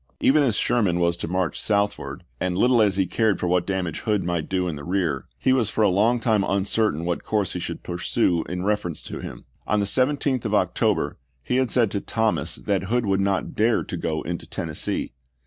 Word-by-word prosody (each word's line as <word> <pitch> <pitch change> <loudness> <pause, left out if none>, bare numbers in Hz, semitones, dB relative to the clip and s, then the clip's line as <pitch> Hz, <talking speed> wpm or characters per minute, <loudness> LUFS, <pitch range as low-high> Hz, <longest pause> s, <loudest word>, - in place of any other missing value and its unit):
Eager 150 +3 +4
as 120 -6 +2
Sherman 100 -9 +1
was 85 0 +2
to 85 - -4
march 90 -3 -1
southward, 100 -1 -1 0.2
and 90 -1 -1
little 120 +2 +4
as 100 -3 +3
he 95 - +3
cared 110 +2 +1
for - - -2
what 90 0 +1
damage 95 -4 -2
Hood 105 -4 0
might 85 -2 -2
do 90 -1 0
in 85 - -3
the 70 - -8
rear, 85 -6 -1
he 130 - +2
was 125 -5 +2
for 110 - +1
a 105 - +5
long 110 +6 +3
time 110 -4 +2
uncertain 100 -3 0
what 85 -1 -2
course 105 -4 0
he - - -3
should - - -5
pursue 85 -1 0
in 90 +1 -3
reference 105 -6 -1
to - - -6
him. - - -8 0.2
On 105 - +2
the 100 - +1
17th 130 +2 +1
of - - 0
October - - +1 0.3
he 125 - 0
had 130 -2 +2
said 115 -5 +2
to 100 - -2
Thomas 85 -8 0
that 95 -2 -1
Hood 120 +3 0
would 95 -1 +1
not 95 -2 0
dare 110 +1 +2
to - - -5
go 80 -2 -2
into 85 +1 -5
Tennessee. - - -3
100 Hz, 215 wpm, -24 LUFS, 90-110 Hz, 0.3 s, a